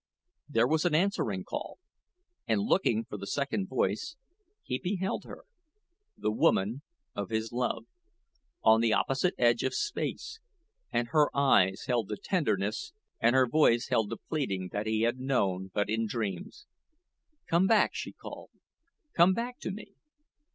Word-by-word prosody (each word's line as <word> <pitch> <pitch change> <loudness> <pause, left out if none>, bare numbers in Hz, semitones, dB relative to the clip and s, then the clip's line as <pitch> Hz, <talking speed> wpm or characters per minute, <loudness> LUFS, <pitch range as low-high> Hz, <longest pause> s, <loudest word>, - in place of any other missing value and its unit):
There 115 -4 +3
was 155 +2 +1
an 175 -4 +2
answering 155 - 0
call, - - -6 0.7
and - - +2
looking 120 - +2
for 105 - -7
the 100 0 -7
second 110 -7 -1
voice, 120 - -1 0.5
he 125 0 -3
beheld 190 +1 -2
her - - -11 0.7
the 105 - -1
woman 110 +3 +2 0.3
of 100 -2 -4
his 110 0 -2
love 125 - -2 0.8
on 110 +1 +6
the 115 -2 +3
opposite 135 +10 +1
edge 120 -1 +3
of 130 - -1
space; 335 +6 -3 0.5
and 120 0 0
her 150 -2 +4
eyes 95 -9 +4
held 120 -5 0
the 105 - -4
tenderness, 110 - -1 0.3
and 120 +3 +3
her 130 -1 +6
voice 120 -3 +3
held 110 -2 +1
the - - -4
pleading 100 - -3
that 105 +1 -3
he 110 0 +1
had 120 +2 +1
known 95 -8 0
but 105 +2 0
in 110 +1 0
dreams. 105 - -4 0.8
"Come 175 +3 +3
back," 220 -1 +4
she - - -5
called; - - -10 0.6
"come 175 +2 +5
back 245 +1 -4
to - - -4
me." 200 +1 -8
120 Hz, 150 wpm, -30 LUFS, 105-160 Hz, 0.8 s, on